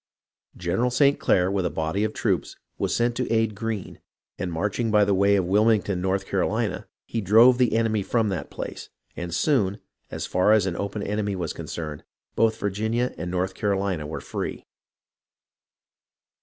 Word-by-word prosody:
General 95 +8 0
St. 140 +3 +3
Clair, 90 +1 +2
with 100 -2 0
a 90 - 0
body 80 +6 -1
of 110 - 0
troops, 95 -8 -1 0.2
was - - 0
sent 120 0 +1
to 125 - -2
aid 115 -1 +2
Greene, 110 -1 -5 0.4
and 90 -1 -2
marching 105 +7 -1
by 105 -1 +4
the 100 - +2
way 100 +1 +4
of 95 -3 +1
Wilmington, 100 -1 +2
North 95 +1 0
Carolina, 100 +1 -1 0.2
he 115 - -3
drove 115 +6 +6
the 120 -3 +3
enemy 110 -2 +1
from 110 +2 0
that 95 -4 -4
place; - - -7 0.3
and 85 0 -5
soon, 105 - +1 0.3
as - - -4
far 90 +4 +3
as 105 -3 +4
an 90 -3 -2
open 100 +2 -3
enemy 105 -1 -1
was 85 -4 -3
concerned, 75 -3 -6 0.3
both 110 -1 +2
Virginia 110 +5 -1
and 90 - -5
North 90 +1 -1
Carolina 95 -6 -1
were 80 - -5
free. - - -5
100 Hz, 170 wpm, -25 LUFS, 95-110 Hz, 0.4 s, drove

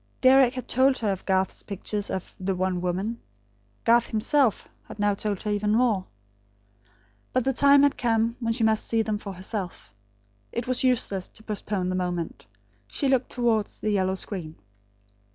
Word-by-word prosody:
Deryck 260 -1 +6
had 255 - -5
told 260 +1 +3
her 215 -3 0
of 190 - -5
Garth's 190 0 +1
pictures 205 +1 -4
of 190 - -5
the 190 0 -1
One 185 -1 -1
Woman. 190 +6 -2 0.6
Garth, 235 +1 +4
himself, 230 +2 +1 0.2
had - - -10
now 205 -1 +2
told 200 -1 -3
her 210 - -1
even 210 0 +1
more. 225 -6 +2 1.3
But 255 - +2
the 270 - +1
time 280 +2 +6
had 285 - +2
come 230 -1 +1
when 230 -2 0
she 230 0 -1
must 220 -1 +2
see 225 -1 +1
them 215 -1 -2
for 200 -2 -7
herself. 185 - -6 0.6
It 235 0 -3
was 255 0 0
useless 225 -7 +1
to 220 - -15
postpone 205 -3 -2
the 185 - -1
moment. 175 -8 -3 0.4
She 275 - -1
looked 265 -1 +2
towards 230 -4 0
the 215 - -1
yellow 190 -2 +1
screen. 175 -5 -5
215 Hz, 170 wpm, -26 LUFS, 190-240 Hz, 1.3 s, Deryck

